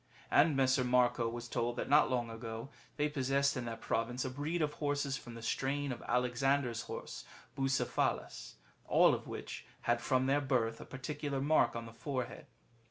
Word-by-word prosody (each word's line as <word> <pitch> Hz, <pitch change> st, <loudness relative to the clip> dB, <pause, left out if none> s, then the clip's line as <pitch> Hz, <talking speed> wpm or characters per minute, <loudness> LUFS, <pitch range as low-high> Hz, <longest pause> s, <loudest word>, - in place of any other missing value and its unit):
And 150 Hz, 0 st, +5 dB
Messer 130 Hz, -1 st, +3 dB
Marco 125 Hz, -2 st, +3 dB
was 120 Hz, +1 st, -6 dB
told 120 Hz, 0 st, -1 dB
that -, -, -3 dB
not 150 Hz, +2 st, +5 dB
long 120 Hz, -3 st, -1 dB
ago 115 Hz, +2 st, -6 dB, 0.3 s
they 150 Hz, 0 st, +2 dB
possessed 140 Hz, -1 st, +1 dB
in 125 Hz, -2 st, -3 dB
that 115 Hz, -1 st, -5 dB
province 120 Hz, +3 st, -1 dB
a 130 Hz, -, -3 dB
breed 155 Hz, +5 st, -1 dB
of 150 Hz, -1 st, -1 dB
horses 145 Hz, -2 st, -1 dB
from 120 Hz, -3 st, -8 dB
the 115 Hz, -, -9 dB
strain 140 Hz, +4 st, -1 dB
of 120 Hz, -, -5 dB
Alexander's 125 Hz, 0 st, +1 dB
horse -, -, -7 dB, 0.3 s
Bucephalus, 135 Hz, -1 st, -1 dB, 0.3 s
all -, -, +6 dB
of -, -, -4 dB
which -, -, -6 dB, 0.2 s
had 120 Hz, 0 st, +1 dB
from 130 Hz, 0 st, +2 dB
their 140 Hz, +2 st, +3 dB
birth 120 Hz, -5 st, 0 dB
a -, -, -8 dB
particular 140 Hz, +2 st, -4 dB
mark 145 Hz, 0 st, +3 dB
on 115 Hz, 0 st, -4 dB
the 115 Hz, -, -10 dB
forehead. 125 Hz, +3 st, -4 dB
130 Hz, 175 wpm, -34 LUFS, 120-140 Hz, 0.3 s, all